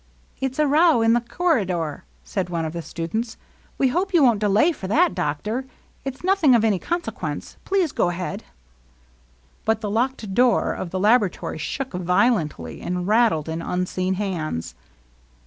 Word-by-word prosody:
" - - -35
It 265 -1 -1
's - - -13
a 305 - +3
row 300 -3 +4
in 225 0 +4
the 240 - +3
corridor," 200 - -1 0.2
said 185 -3 -3
one 165 -2 -2
of 155 - -4
the 170 - -4
stu 165 0 -5
dents. 220 +7 -3 0.2
" - - -33
We 265 - +3
hope 365 +7 0
you 320 - +6
won't 235 -5 +4
delay 210 - +3
for 195 - -7
that, 330 - +3
doctor. 210 - -2 0.4
It 270 -1 -4
's - - -20
nothing 355 -8 +4
of 225 - +3
any 205 -4 +2
consequence. 345 - -4
Please 380 -6 +1
go 175 - +1
ahead." 180 +4 -4 1.2
But 220 0 +1
the 210 -2 -3
locked 230 -2 -1
door 245 0 +3
of 180 - -5
the 185 - -3
laboratory 210 -5 +2
shook 265 - -4
vio 180 +7 +3
lently, 150 - -5
and 180 0 -2
rattled 215 -8 +3
in 160 +1 -3
unseen 185 +2 -1
hands. 160 - -3
215 Hz, 180 wpm, -23 LUFS, 180-260 Hz, 1.2 s, you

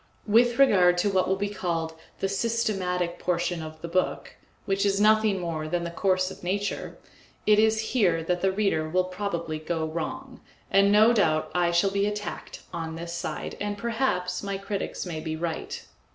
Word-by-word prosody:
With 235 +3 +4
regard 180 -10 +5
to 200 +3 +2
what 190 -1 +2
will 190 - +2
be 200 +1 -2
called 170 -5 -2 0.3
the 195 - +2
systematic 195 -5 -1
portion 175 -1 -1
of 155 0 -9
the - - -3
book, 185 +2 -1 0.3
which 195 -1 0
is 200 -1 +2
nothing 215 -1 +4
more 165 -3 -3
than 175 +2 -1
the 170 - -4
course 185 +1 +1
of - - -11
nature, 200 +3 -3 0.5
it 210 0 +5
is 220 0 +4
here 175 -10 +2
that 175 +1 -1
the 190 - +2
reader 190 -6 0
will 185 +3 +2
probably 180 -4 -3
go 160 0 -2
wrong, 250 +12 -5 0.3
and 195 +1 +5
no 215 +3 +6
doubt 160 -8 +2
I 175 -1 +2
shall 175 +3 +2
be 200 +1 +1
attacked 210 0 -5
on 160 -1 -4
this 170 +1 -6
side, 170 - -4
and 205 0 -2
perhaps 220 -6 -1
my 200 -1 -3
critics 195 0 -4
may 165 -3 -4
be 160 0 -4
right. 165 0 -4
185 Hz, 180 wpm, -26 LUFS, 170-205 Hz, 0.5 s, no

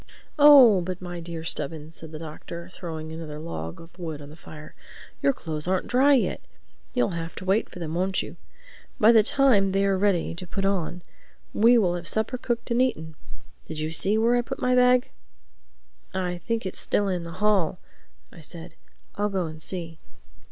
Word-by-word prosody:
"Oh, 270 -9 +8
but 185 +1 -5
my 175 -1 -6
dear 165 -1 -7
Stubbins," 160 -1 -3
said 160 -1 -9
the 155 - -7
Doctor, 170 +3 -8
throwing 160 -3 -7
another 160 -2 -7
log 80 - -6
of 165 +2 -15
wood 160 -4 -5
on 145 0 -11
the - - -12
fire, 150 -2 -12 0.5
"your 275 - +4
clothes 160 - -4
aren't 185 0 0
dry 275 +3 +4
yet. 255 - 0 0.5
You'll 245 - +2
have 165 -1 -5
to - - -8
wait 195 +4 +1
for - - -12
them, 165 -3 -5
won't 185 +2 0
you? - - -9 0.6
By 220 +2 +7
the 225 -2 +7
time 210 -5 +3
they 195 0 +2
are 195 -1 +2
ready 195 -5 +1
to 180 +2 -9
put 195 +2 -3
on 180 -3 -1 0.5
we 235 +3 +5
will 185 -6 +2
have 175 -1 -5
supper 220 +3 0
cooked 240 -1 -3
and 235 +2 +3
eaten—Did 160 -6 -5
you 155 +1 -3
see 200 +6 +3
where 230 +2 +3
I 245 - +3
put 240 - -6
my 250 - +1
bag?" 250 0 +4 1.0
"I 180 -2 -2
think 230 -2 -1
it 190 - -3
is - - -8
still 205 - 0
in 180 -3 -2
the 170 0 -8
hall," 190 -3 +1 0.5
I 170 - -13
said. 165 +1 -9 0.4
"I'll 205 +1 -1
go 190 -3 -1
and 155 -1 -8
see." 165 -2 -6
180 Hz, 195 wpm, -25 LUFS, 165-215 Hz, 1.0 s, Oh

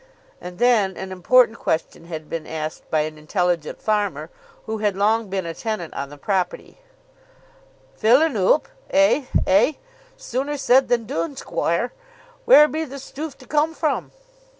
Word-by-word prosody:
And 180 0 -8
then 220 -6 +2
an 190 0 -6
important 230 +6 +3
question 165 +1 -2
had 160 -2 -7
been 165 -2 -5
asked 155 -1 -6
by 155 - +2
an 155 0 -5
intelligent 175 0 -1
farmer 210 - -1 0.3
who 220 0 -4
had 205 -2 0
long 215 +3 +1
been 190 -2 -2
a 165 - -4
tenant 215 -5 -4
on 140 0 -5
the 145 - -12
property; 185 - -3 1.2
"Fill 240 +7 +5
un 320 -6 0
oop; 200 +9 +3 0.2
eh, 290 -1 +3 0.2
eh; 220 +10 +4 0.4
sooner 275 +4 -3
said 265 -1 +4
than 235 -2 +1
doone, 165 - -3
squoire. - - -1 0.5
Where 300 -11 +8
be 315 +1 -3
the 280 -2 -8
stoof 280 +2 -7
to 260 - -15
come 305 +4 0
from?" 310 -1 -1
215 Hz, 155 wpm, -22 LUFS, 175-265 Hz, 1.2 s, Where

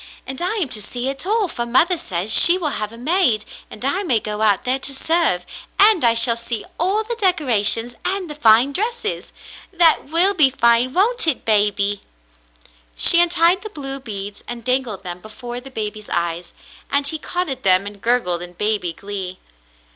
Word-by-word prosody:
And 265 +3 -7
I 365 +5 -1
am 365 -11 -2
to 215 - -2
see 245 +5 -4
it 275 +6 -5
all, 430 -1 +1
for 240 -7 -4
mother 260 +10 +2
says 190 - -4
she 345 +1 +8
will 330 -5 -1
have 210 0 -3
a 230 - -12
maid, 255 - +1 0.2
and 230 - -8
I 360 +8 0
may 290 - +1
go 210 0 -5
out 205 -3 +2
there 255 +2 -1
to 275 +1 -3
serve, 320 - 0 0.3
and 410 -5 +6
I 230 -1 +4
shall 230 0 +5
see 235 -1 -5
all 390 +6 +1
the 460 +2 -5
decorations 250 - +1
and 380 0 -2
the 300 - -7
fine 245 -1 +4
dresses. 440 - -4 0.4
That 340 -3 +3
will 340 +7 +2
be 305 -8 +4
fine, 235 -1 +2
won't 440 +3 +1
it, 305 - -1
baby? 205 -1 +1 0.5
" - - -34 0.3
She 345 - +6
untied 345 +2 +3
the 430 - -8
blue 275 -7 -7
beads 205 -4 -8
and 235 -1 -8
dangled 250 -6 -1
them 175 -1 -6
before 240 +4 -8
the 265 +2 -11
baby's 215 -3 -6
eyes, 170 0 -3 0.3
and 280 0 0
he 310 +2 -3
caught 360 +3 -3
at 265 -2 -5
them 185 -1 +3
and 205 -1 -9
gurgled 230 -8 0
in 175 0 -9
baby 205 -3 0
glee. 190 0 -6
250 Hz, 190 wpm, -19 LUFS, 210-340 Hz, 0.5 s, she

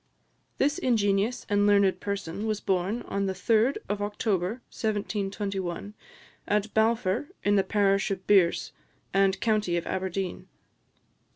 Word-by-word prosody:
This 290 +5 +1
ingenious 220 - +1
and 205 0 +2
learned 200 -2 +4
person 200 0 -4
was 215 -1 -1
born 190 +5 -1
on 200 0 -2
the 190 - -1
3d 230 +6 +2
of 205 +1 -2
October 205 -2 -1 0.2
1721, 200 -3 -3 0.5
at 210 +1 0
Balfour, 220 +2 +1 0.2
in 205 0 +3
the 195 - +4
parish 200 -1 +2
of 190 -1 -4
Birse, 190 -4 +3 0.4
and 195 0 +3
county 210 -6 +1
of 170 - -3
Aberdeen. 190 0 -3
200 Hz, 125 wpm, -27 LUFS, 190-215 Hz, 0.5 s, learned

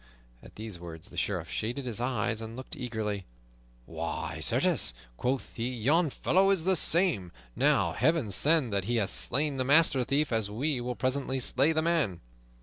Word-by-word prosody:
At - - -15
these 110 -4 -5
words 85 +2 -10
the - - -13
Sheriff 90 -5 -2
shaded 120 +10 -3
his 120 -2 -3
eyes 120 -2 -1
and 115 0 -7
looked 130 +1 -8
eagerly. 110 -6 -4 0.6
"Why, - - -5
certes," - - +2 0.2
quoth 125 - -2
he, 120 +1 -2
"yon 150 +8 +2
fellow 190 +7 +2
is 195 -5 +2
the 190 +2 +3
same. 165 - +2 0.2
Now, - - +2
Heaven 135 -3 +1
send 140 - +2
that 100 -2 0
he 120 +3 -1
hath 105 -4 0
slain 140 +2 +1
the 130 - 0
master 140 -1 +4
thief, 140 +4 0
as 110 -3 0
we 130 +5 -1
will 125 0 -3
presently 130 +1 -1
slay 130 +4 +2
the 160 0 0
man!" 160 - 0
125 Hz, 175 wpm, -29 LUFS, 110-150 Hz, 0.6 s, master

